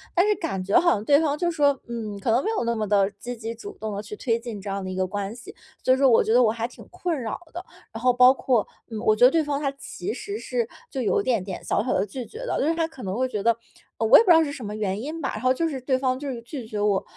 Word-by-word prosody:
但 360 +3 +4
是 420 - +4
感 195 - -3
觉 200 - +4
好 345 0 +4
像 205 - 0
对 285 +4 +5
方 295 -2 0
就 345 0 0
说， 285 -4 +2
嗯， 220 -4 -5
可 225 - 0
能 245 +4 +3
没 440 - -1
有 - - 0
那 235 0 0
么 215 -1 -2
地 200 -1 +3
积 245 0 -5
极 225 0 -5
主 405 - -10
动 215 -1 -4
地 205 - -3
去 210 0 -8
推 230 0 0
进 230 -4 -7
这 200 - -6
样 195 0 -3
的 185 - -5
一 185 - -4
个 185 0 0
关 205 +3 -4
系。 245 - -11 0.3
所 255 - +4
以 - - +2
说 270 -1 +5
我 230 - +5
觉 220 - +1
得 250 - +6
我 215 - +4
还 230 +1 -3
挺 245 - -14
困 355 -4 -3
扰 225 - -4
的， 350 +2 -6 0.3
然 225 - -6
后 250 0 +4
包 250 +1 +7
括， 250 -5 +1 0.3
嗯， 220 - -4
我 215 0 +3
觉 245 - +6
得 260 - +7
对 325 -2 +2
方 285 -1 -2
他 275 - +1
其 275 - -6
实 410 +1 -5
是 470 0 -2 0.2
就 265 - -3
有 200 -5 +2
一 - - -6
点 230 -7 +1
点 190 -2 -6
小 - - 0
小 255 - 0
地 195 - +1
拒 240 +4 -6
绝 440 - -11
的， - - -1
就 295 - +1
是 330 - +2
他 325 -1 0
可 295 -6 -12
能 190 +3 -3
会 260 0 +1
觉 210 -5 -3
得 230 -1 +4 0.4
呃， 225 - 0
我 - - +9
也 - - +6
不 380 - -1
知 335 - +9
道 325 - +5
是 285 - -3
什 250 -6 -7
么 210 +1 -5
原 205 -1 -2
因 310 +5 -5
吧， 265 - -1
然 - - -5
后 255 0 +3
就 330 +5 0
是 275 -4 -4
对 260 0 +1
方 255 -1 0
就 285 -1 -5
是 235 -2 -6
拒 245 0 -7
绝 210 -2 -4
我， 205 -2 +2
245 Hz, 355 characters per minute, -25 LUFS, 215-285 Hz, 0.4 s, 我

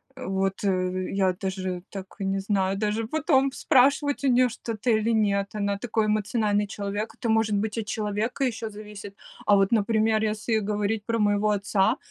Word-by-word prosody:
Вот, 195 -6 -2
э, 185 -1 0
я 190 -2 +2
даже, 185 -1 -4
так, 195 -1 -9
не 195 0 -1
знаю 195 -1 0
даже, 215 +2 -1
потом 275 -1 +2
спрашивать 280 +1 +2
у 275 - +3
нее 250 0 +4
что-то 230 0 -4
или 220 0 +2
нет, 200 -2 +1
она 200 -1 -1
такой 220 0 -1
эмоциональный 210 -1 +1
человек. 205 +2 -4
Это, - - -4
может 220 -1 +2
быть, 215 +2 -2
от 225 - -2
человека 215 +5 -2
еще 225 -3 -3
зависит. 210 -1 -10 0.3
А 205 - +5
вот, 195 0 +2
например, 220 0 +2
если 220 +1 0
говорить 210 +1 -2
про 230 -1 -1
моего 205 0 +2
отца, 205 +3 +1
210 Hz, 170 wpm, -26 LUFS, 200-225 Hz, 0.3 s, А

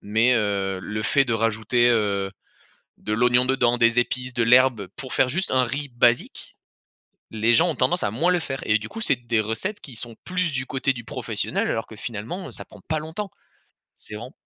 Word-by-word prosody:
Mais, 110 +4 +3
heu, 100 -4 0
le 105 +4 -4
fait 135 +4 +3
de 115 - +1
rajouter, 115 +2 +2
heu, 100 -4 +1 0.7
de 105 - -3
l'oignon 125 +2 +4
dedans, 120 -2 +2
des 115 0 +4
épices, 125 +1 -2
de 120 - 0
l'herbe 120 -4 +4
pour 135 -4 -6
faire 130 - +3
juste 190 +7 -1
un 130 -1 +3
riz 140 +4 -3
basique, 120 0 0 0.8
les 110 +2 +2
gens 175 +2 +4
ont 160 - -1
tendance 130 +8 +1
à 100 - -1
moins 170 +10 +2
le 180 - +3
faire. 135 -5 -5
Et 105 +1 +3
du 105 - -8
coup 225 - -8
c'est 215 - +2
des 120 -2 0
recettes 185 - -1
qui 130 -5 -10
sont 115 0 -4
plus 180 -3 -1
du 130 0 -2
côté 135 0 0
du 120 -2 -8
professionnel - - -2
alors 115 - -2
que 110 - -11
finalement, 115 - -6
heu, - - -9
ça - - -5
prend - - -16
pas 155 0 0
longtemps, 165 +6 -6 0.7
c'est - - -9
vraiment 115 +4 -8
120 Hz, 210 wpm, -23 LUFS, 110-135 Hz, 0.8 s, l'oignon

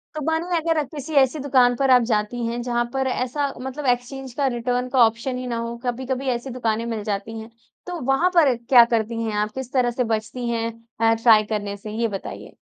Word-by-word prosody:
तो 305 - -3
मानो 320 +2 0
अगर 325 0 0
आप 290 - -2
किसी 295 +2 -6
ऐसी 265 +3 +1
दुकान 255 -3 +3
पर 270 +2 +1
आप 250 -1 +7
जाती 220 +3 -1
हैं, 235 +1 -2
जहाँ 240 0 0
पर 265 0 0
ऐसा 260 +3 -1
मतलब 265 +3 -5
एक्सचेंज 250 +1 -1
का, 275 +2 0
रिटर्न 245 0 -1
का 260 - +1
ऑप्शन 230 +3 -2
ही 255 - -5
ना 235 -1 -2
हो, 230 0 -4
कभी-कभी 260 +2 -2
ऐसी 240 +3 -6
दुकानें 230 -3 -1
मिल 225 -3 -3
जाती 215 +2 -4
हैं। 220 +1 -9 0.4
तो 355 -1 -4
वहाँ 340 +7 +3
पर 295 -7 +5
क्या 245 -3 +8
करती 225 +1 -2
हैं 220 - -2
आप, 210 +1 -1
किस 265 -1 -6
तरह 250 -2 +2
से 250 +1 -1
बचती 220 +3 -3
हैं 230 -1 -1 0.3
अ, 225 0 +5
ट्राई 225 -1 +5
करने 205 -1 -3
से, 210 +1 -8
ये 230 +2 0
बताइए। 195 -3 -7
245 Hz, 220 wpm, -23 LUFS, 225-265 Hz, 0.4 s, क्या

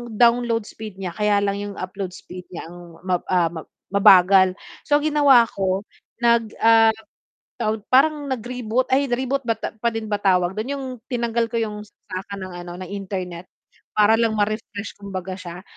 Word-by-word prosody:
download 235 -1 +3
speed 215 -4 -9
niya 190 -2 -4
kaya 205 0 +2
lang 200 0 -1
yung 205 0 -5
upload 185 0 -5
speed 180 0 -11
niya 175 - -8
ang 175 - -11 0.3
ma, 185 -2 0
ah, 175 -3 +2
ma 160 - -6 0.3
mabagal. 190 -2 +6 0.3
So 290 - +4
ang 295 - -3
ginawa 280 -5 +6
ko 190 0 -1 0.4
nag, 235 -1 +4 0.2
ah, 225 -1 +6 0.6
tawag, 215 -2 -1
parang 290 +2 +4
nag-reboot 245 0 -2
ay 275 +1 +3
reboot 265 +2 -1
ba 230 - +2
ta - - -5
pa 235 +2 +1
din 225 -1 -4
ba 205 - +2
tawag 180 -1 +2
dun 220 +5 -3
yung 275 -1 -5 0.3
tinanggal 235 -1 0
ko 230 - 0
yung 210 -2 -3
saksakan 200 -1 -8
ng 185 - -8
ano, 175 - -8
ng 185 - -7
internet 185 -3 -5 0.5
para 215 +1 +5
lang 225 -2 +1
ma-refresh 210 0 -3
kumbaga 190 -2 -5
siya. 175 0 -9
210 Hz, 175 wpm, -22 LUFS, 185-235 Hz, 0.6 s, mabagal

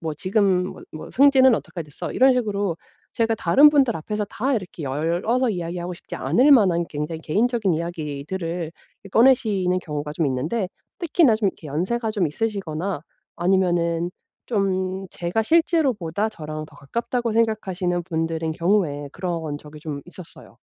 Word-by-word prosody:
"뭐 160 -1 -3
지금 185 +1 +1
뭐 - - -10
뭐 155 - -8
승진은 265 -2 +6
어떻게 175 -5 -5
됐어?" 145 -2 -7
이런 265 +1 +5
식으로 205 -7 -1 0.4
제가 225 -1 +1
다른 275 - +6
분들 270 -6 +3
앞에서 210 +6 -3
다 260 +7 -1
이렇게 185 -6 -5
열어서 170 - 0
이야기하고 175 -1 -4
싶지 - - -10
않을 275 +4 +4
만한 185 -9 +4
굉장히 150 +2 -4
개인적인 215 +3 +1
이야기들을 165 +1 -4 0.3
이 - - -10
꺼내시는 205 -6 +3
경우가 150 -3 -5
좀 160 0 0
있는데 155 - -1 0.3
특히나 330 - +3
좀 215 -2 +1
이렇게 170 - -8
연세가 215 - -1
좀 200 -5 +1
있으시거나 190 -2 -3 0.4
아니면은 175 -2 +1 0.4
좀 190 -3 -1
제가 175 +6 -1
실제로보다 240 - +1
저랑 155 -6 -7
더 150 - -18
가깝다고 235 - -2
생각하시는 195 -6 0
분들인 165 -2 -2
경우에 165 -5 0
그런 165 -5 -3
적이 150 0 -13
좀 150 -2 -5
있었어요. 175 -1 -13
185 Hz, 360 characters per minute, -23 LUFS, 165-225 Hz, 0.4 s, 승진은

